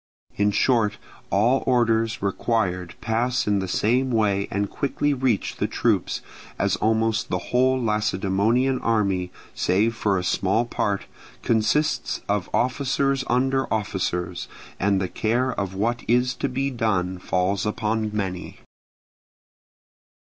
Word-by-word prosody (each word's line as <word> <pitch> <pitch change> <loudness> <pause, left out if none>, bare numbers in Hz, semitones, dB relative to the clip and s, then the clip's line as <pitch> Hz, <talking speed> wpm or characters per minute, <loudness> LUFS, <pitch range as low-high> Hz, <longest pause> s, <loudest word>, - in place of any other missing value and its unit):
In 105 0 +2
short 110 -1 +2 0.3
all 115 +7 +3
orders 115 -4 +2
required 95 -3 -1
pass 120 +2 0
in 105 -1 +2
the 95 - -3
same 125 +8 +1
way 105 -4 +1
and 100 +1 -1
quickly 140 +5 -1
reach 125 - 0
the - - 0
troops; - - 0 0.3
as - - +1
almost 110 +1 +1
the - - 0 0.2
whole 130 +1 +3
Lacedaemonian 110 +3 +1
army, 100 -5 0 0.2
save 105 +5 +1
for 100 -3 +1
a 90 - -2
small 95 +5 +1
part, 100 -4 -1 0.4
consists 120 +8 +1
of 100 -2 -1
officers 135 +1 +1
under 135 +2 +1
officers, 95 -4 -2 0.3
and 100 0 +2
the 95 - -1
care 120 +7 0
of 95 -3 -3
what 115 +4 0
is 125 +2 +3
to 135 +2 -2
be 135 +2 -1
done 95 -7 -1
falls 95 +2 0
upon 110 0 -1
many. 95 -4 -4
110 Hz, 130 wpm, -24 LUFS, 100-125 Hz, 0.4 s, all